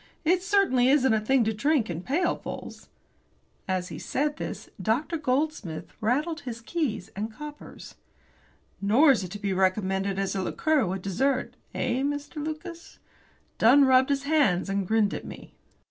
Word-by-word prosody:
"It 360 Hz, +3 st, +3 dB
certainly 370 Hz, -11 st, +3 dB
isn't 265 Hz, -4 st, +4 dB
a 220 Hz, -, +3 dB
thing 250 Hz, +4 st, +2 dB
to 220 Hz, 0 st, 0 dB
drink 265 Hz, +2 st, +1 dB
in 170 Hz, -1 st, -4 dB
pailfuls." 325 Hz, -, -3 dB, 0.8 s
As 185 Hz, -1 st, -1 dB
he 155 Hz, -2 st, -7 dB
said 295 Hz, +2 st, -1 dB
this, -, -, -6 dB
Dr. 265 Hz, +10 st, 0 dB
Goldsmith 255 Hz, -, -2 dB
rattled 295 Hz, +9 st, 0 dB
his 240 Hz, -5 st, -7 dB
keys 230 Hz, -, -3 dB
and 215 Hz, +3 st, -3 dB
coppers. 295 Hz, +6 st, -10 dB, 0.9 s
"Nor 240 Hz, +10 st, +5 dB
is 230 Hz, -7 st, +1 dB
it 180 Hz, -, -6 dB
to 205 Hz, -, -6 dB
be 200 Hz, -2 st, -2 dB
recommended 190 Hz, +1 st, 0 dB
as 195 Hz, -1 st, -1 dB
a 190 Hz, -, 0 dB
liqueur 295 Hz, +4 st, +1 dB
with 185 Hz, +1 st, -4 dB
dessert 260 Hz, +8 st, 0 dB, 0.2 s
eh, 250 Hz, +1 st, 0 dB
Mr. 290 Hz, +2 st, -3 dB
Lucas?" 335 Hz, +2 st, -7 dB, 0.6 s
Dunn 270 Hz, +5 st, +6 dB
rubbed 260 Hz, 0 st, +5 dB
his 280 Hz, -1 st, 0 dB
hands, 280 Hz, -, +2 dB
and 195 Hz, -1 st, -1 dB
grinned 215 Hz, -1 st, +2 dB
at -, -, -5 dB
me. -, -, -11 dB
255 Hz, 160 wpm, -27 LUFS, 200-295 Hz, 0.9 s, Dunn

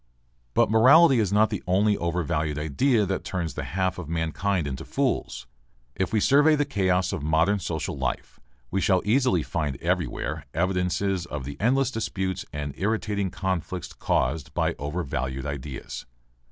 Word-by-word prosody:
But -, -, +3 dB
morality 130 Hz, +5 st, +7 dB
is 105 Hz, -4 st, +1 dB
not 105 Hz, +2 st, +3 dB
the 105 Hz, -, -2 dB
only 100 Hz, +3 st, +3 dB
overvalued 80 Hz, -4 st, -1 dB
idea 105 Hz, -, +2 dB
that 95 Hz, 0 st, -2 dB
turns 85 Hz, -3 st, -3 dB
the -, -, -4 dB
half 95 Hz, 0 st, -1 dB
of 80 Hz, -4 st, -7 dB
mankind 85 Hz, +2 st, -1 dB
into 65 Hz, -2 st, -4 dB
fools. -, -, -2 dB, 0.5 s
If 95 Hz, -2 st, -1 dB
we 110 Hz, -, +2 dB
survey 145 Hz, +7 st, +5 dB
the 145 Hz, 0 st, +1 dB
chaos 95 Hz, -, +1 dB
of -, -, -3 dB
modern 80 Hz, +7 st, +2 dB
social 80 Hz, -4 st, -3 dB
life -, -, -4 dB, 0.3 s
we 95 Hz, -, 0 dB
shall 95 Hz, -3 st, +2 dB
easily 110 Hz, -, +2 dB
find 75 Hz, -6 st, -2 dB
everywhere 75 Hz, 0 st, -2 dB
evidences 90 Hz, +1 st, 0 dB
of 75 Hz, -5 st, -5 dB
the 70 Hz, +1 st, -6 dB
endless 130 Hz, +3 st, +2 dB
disputes 95 Hz, -5 st, -3 dB
and 75 Hz, -1 st, -4 dB
irritating 105 Hz, -1 st, 0 dB
conflicts 90 Hz, -1 st, -3 dB
caused 75 Hz, +3 st, -1 dB
by -, -, +1 dB
overvalued 70 Hz, -4 st, -3 dB
ideas. 70 Hz, -3 st, -6 dB
90 Hz, 155 wpm, -26 LUFS, 80-105 Hz, 0.5 s, morality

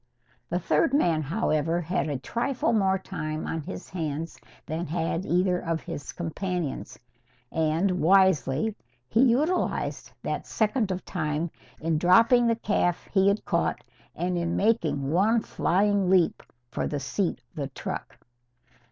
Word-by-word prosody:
The 175 Hz, -, 0 dB
third 170 Hz, -, +2 dB
man, 170 Hz, -, +3 dB
however, 165 Hz, 0 st, 0 dB
had 175 Hz, -1 st, -1 dB
a 145 Hz, -, -1 dB
trifle 235 Hz, -, -1 dB
more 195 Hz, -3 st, +3 dB
time 155 Hz, -5 st, -5 dB
on 160 Hz, -, -3 dB
his 90 Hz, -10 st, -7 dB
hands 160 Hz, -2 st, -4 dB, 0.3 s
than 160 Hz, +3 st, -3 dB
had 165 Hz, +3 st, -2 dB
either 180 Hz, +1 st, +2 dB
of 165 Hz, -2 st, -2 dB
his 145 Hz, -, -6 dB
companions. 175 Hz, -2 st, -4 dB, 0.5 s
And, 165 Hz, +4 st, +1 dB
wisely, 190 Hz, 0 st, +3 dB, 0.3 s
he 220 Hz, -, +2 dB
utilised 280 Hz, +8 st, +1 dB
that -, -, -3 dB
second 220 Hz, 0 st, +1 dB
of 185 Hz, 0 st, -3 dB
time 155 Hz, -1 st, -2 dB, 0.3 s
in 160 Hz, -1 st, 0 dB
dropping 230 Hz, +8 st, +5 dB
the 230 Hz, -, +3 dB
calf 200 Hz, -5 st, 0 dB
he 195 Hz, -1 st, +4 dB
had 200 Hz, +1 st, +1 dB
caught -, -, 0 dB, 0.3 s
and 180 Hz, 0 st, -1 dB
in 170 Hz, 0 st, -1 dB
making 165 Hz, -11 st, +1 dB
one 210 Hz, +7 st, +3 dB
flying 200 Hz, +1 st, +1 dB
leap 185 Hz, -3 st, +3 dB, 0.3 s
for -, -, -2 dB
the 145 Hz, -, -2 dB
seat 170 Hz, +7 st, -1 dB
of -, -, -36 dB
the 140 Hz, -2 st, -2 dB
truck. 135 Hz, -, -6 dB
175 Hz, 145 wpm, -27 LUFS, 155-200 Hz, 0.5 s, dropping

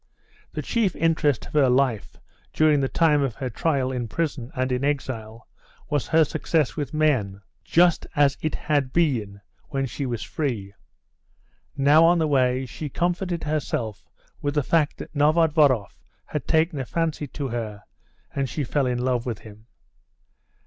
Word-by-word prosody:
The -, -, -4 dB
chief 220 Hz, -6 st, 0 dB
interest 155 Hz, -5 st, +1 dB
of -, -, -12 dB
her 145 Hz, -4 st, +4 dB
life 125 Hz, -4 st, +1 dB, 0.4 s
during 155 Hz, -2 st, +4 dB
the 135 Hz, -, +1 dB
time 155 Hz, -3 st, +3 dB
of 135 Hz, -5 st, -1 dB
her 130 Hz, -1 st, -4 dB
trial 135 Hz, -1 st, 0 dB
in 125 Hz, -2 st, -3 dB
prison 140 Hz, -1 st, -3 dB
and 130 Hz, 0 st, -1 dB
in 125 Hz, +1 st, -1 dB
exile 115 Hz, -6 st, -3 dB, 0.4 s
was 145 Hz, -2 st, 0 dB
her 160 Hz, 0 st, +4 dB
success 150 Hz, -4 st, 0 dB
with 145 Hz, -, -3 dB
men, 135 Hz, -11 st, +1 dB, 0.2 s
just 175 Hz, 0 st, +3 dB
as 145 Hz, -1 st, +4 dB
it 155 Hz, -, -1 dB
had 145 Hz, -4 st, 0 dB
been 115 Hz, -12 st, 0 dB, 0.3 s
when 135 Hz, -2 st, -1 dB
she 135 Hz, +2 st, -4 dB
was 120 Hz, -2 st, -3 dB
free. 115 Hz, -10 st, -3 dB, 1.0 s
Now 145 Hz, +3 st, +6 dB
on 170 Hz, +1 st, +5 dB
the 160 Hz, -, +2 dB
way 130 Hz, -2 st, +2 dB
she 145 Hz, +4 st, -6 dB
comforted 175 Hz, +3 st, -1 dB
herself 125 Hz, -8 st, -2 dB, 0.4 s
with 145 Hz, 0 st, -2 dB
the 145 Hz, -, +2 dB
fact 155 Hz, +1 st, +1 dB
that -, -, -9 dB
Novodvoroff 150 Hz, -, +3 dB, 0.2 s
had 150 Hz, -5 st, -5 dB
taken 160 Hz, -1 st, +2 dB
a 130 Hz, -, -3 dB
fancy 160 Hz, 0 st, -2 dB
to 140 Hz, 0 st, -5 dB
her, 110 Hz, -3 st, -5 dB, 0.5 s
and 135 Hz, -2 st, -1 dB
she 150 Hz, -, -3 dB
fell 135 Hz, +1 st, 0 dB
in 125 Hz, -1 st, 0 dB
love 125 Hz, -1 st, -1 dB
with 115 Hz, -3 st, -4 dB
him. 110 Hz, +1 st, -14 dB
140 Hz, 165 wpm, -24 LUFS, 125-155 Hz, 1.0 s, Now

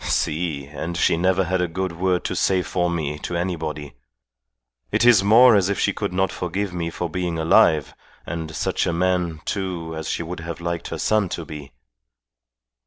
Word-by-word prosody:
"Si! 80 Hz, -3 st, -1 dB
And 80 Hz, +4 st, -5 dB
she -, -, +3 dB
never 95 Hz, +2 st, +2 dB
had 90 Hz, +1 st, 0 dB
a 90 Hz, -, +1 dB
good 95 Hz, +2 st, -3 dB
word 90 Hz, +1 st, 0 dB
to -, -, -3 dB
say 95 Hz, -1 st, +2 dB
for 90 Hz, -1 st, -1 dB
me 75 Hz, -3 st, -2 dB
to 85 Hz, -, -4 dB
anybody. 80 Hz, -5 st, -4 dB, 1.0 s
It -, -, +2 dB
is 115 Hz, -6 st, +6 dB
more 115 Hz, +3 st, +7 dB
as 100 Hz, -2 st, +3 dB
if 100 Hz, -, -1 dB
she -, -, +1 dB
could -, -, -3 dB
not 95 Hz, +1 st, 0 dB
forgive 95 Hz, +2 st, -3 dB
me 85 Hz, -1 st, -2 dB
for 90 Hz, +1 st, -3 dB
being 85 Hz, 0 st, -3 dB
alive, 80 Hz, -2 st, +4 dB, 0.3 s
and 80 Hz, -1 st, -5 dB
such -, -, -1 dB
a 85 Hz, -, 0 dB
man, 90 Hz, -2 st, 0 dB
too, 90 Hz, -5 st, -3 dB
as 80 Hz, 0 st, -5 dB
she -, -, -2 dB
would 85 Hz, +2 st, -6 dB
have 85 Hz, 0 st, -6 dB
liked 85 Hz, 0 st, -3 dB
her -, -, -5 dB
son 105 Hz, -4 st, +1 dB
to 85 Hz, -, -5 dB
be." 75 Hz, -4 st, -9 dB
85 Hz, 190 wpm, -22 LUFS, 80-95 Hz, 1.0 s, more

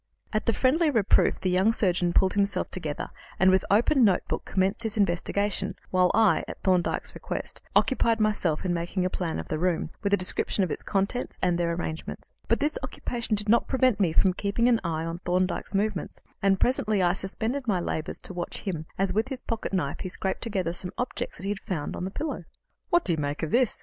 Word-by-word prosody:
At 215 Hz, -, -1 dB
the 230 Hz, -, +4 dB
friendly 305 Hz, +8 st, +3 dB
reproof 225 Hz, -8 st, +3 dB
the 185 Hz, -, +1 dB
young 190 Hz, +5 st, +4 dB
surgeon 180 Hz, -5 st, +1 dB
pulled 190 Hz, +2 st, +3 dB
himself 200 Hz, 0 st, 0 dB
together, 155 Hz, -5 st, -4 dB, 0.3 s
and, 190 Hz, 0 st, +6 dB
with 190 Hz, -, +3 dB
open 240 Hz, +6 st, +4 dB
notebook, 195 Hz, -5 st, +1 dB
commenced 190 Hz, +3 st, 0 dB
his 220 Hz, -1 st, -1 dB
investigation, 200 Hz, +1 st, 0 dB, 0.2 s
while 185 Hz, -1 st, +4 dB
I, 220 Hz, -2 st, +4 dB
at -, -, -7 dB
Thorndyke's 185 Hz, -2 st, +1 dB
request, -, -, -6 dB
occupied 230 Hz, -4 st, +3 dB
myself 195 Hz, -7 st, +1 dB
in 180 Hz, -, +1 dB
making 175 Hz, +2 st, -1 dB
a 185 Hz, -, 0 dB
plan 170 Hz, -3 st, -2 dB
of -, -, -5 dB
the 155 Hz, -, -1 dB
room, 175 Hz, -2 st, 0 dB
with 200 Hz, -2 st, -1 dB
a 200 Hz, -, +5 dB
description 185 Hz, +2 st, +1 dB
of 180 Hz, -, -1 dB
its -, -, -2 dB
contents 200 Hz, +5 st, -1 dB
and 180 Hz, -1 st, +3 dB
their 170 Hz, -1 st, +1 dB
arrangements. 165 Hz, -2 st, -5 dB, 0.2 s
But -, -, +2 dB
this 300 Hz, +1 st, 0 dB
occupation 235 Hz, -2 st, -3 dB
did 210 Hz, +1 st, -2 dB
not 235 Hz, +3 st, +4 dB
prevent 255 Hz, -5 st, +2 dB
me 185 Hz, -5 st, +3 dB
from 185 Hz, +3 st, +3 dB
keeping 200 Hz, +5 st, 0 dB
an 235 Hz, -2 st, +3 dB
eye 165 Hz, -1 st, -2 dB
on 165 Hz, +1 st, -4 dB
Thorndyke's 185 Hz, +2 st, -1 dB
movements, 205 Hz, -1 st, -1 dB, 0.2 s
and 195 Hz, -1 st, +3 dB
presently 215 Hz, -6 st, +2 dB
I 175 Hz, 0 st, +3 dB
suspended 225 Hz, +8 st, -3 dB
my 195 Hz, -5 st, +2 dB
labours 165 Hz, -1 st, -3 dB
to -, -, -5 dB
watch 175 Hz, -1 st, -4 dB
him 165 Hz, -6 st, -4 dB
as, 195 Hz, 0 st, +1 dB
with 220 Hz, +3 st, +1 dB
his 265 Hz, -2 st, -5 dB
pocket 230 Hz, -2 st, -3 dB
knife, 165 Hz, -8 st, -1 dB
he 185 Hz, -, -4 dB
scraped 190 Hz, +1 st, -2 dB
together 190 Hz, -7 st, -1 dB
some 180 Hz, +1 st, -3 dB
objects 245 Hz, -, -3 dB
that -, -, -8 dB
he 195 Hz, -, -2 dB
had 205 Hz, -, -3 dB
found 160 Hz, -6 st, -4 dB
on 180 Hz, -, -4 dB
the -, -, -2 dB
pillow. 270 Hz, -, -4 dB, 0.4 s
"What 345 Hz, 0 st, +3 dB
do 180 Hz, -, 0 dB
you 160 Hz, -, -2 dB
make 145 Hz, +2 st, -2 dB
of 160 Hz, -, -2 dB
this?" 245 Hz, -2 st, +2 dB
195 Hz, 215 wpm, -27 LUFS, 180-220 Hz, 0.4 s, and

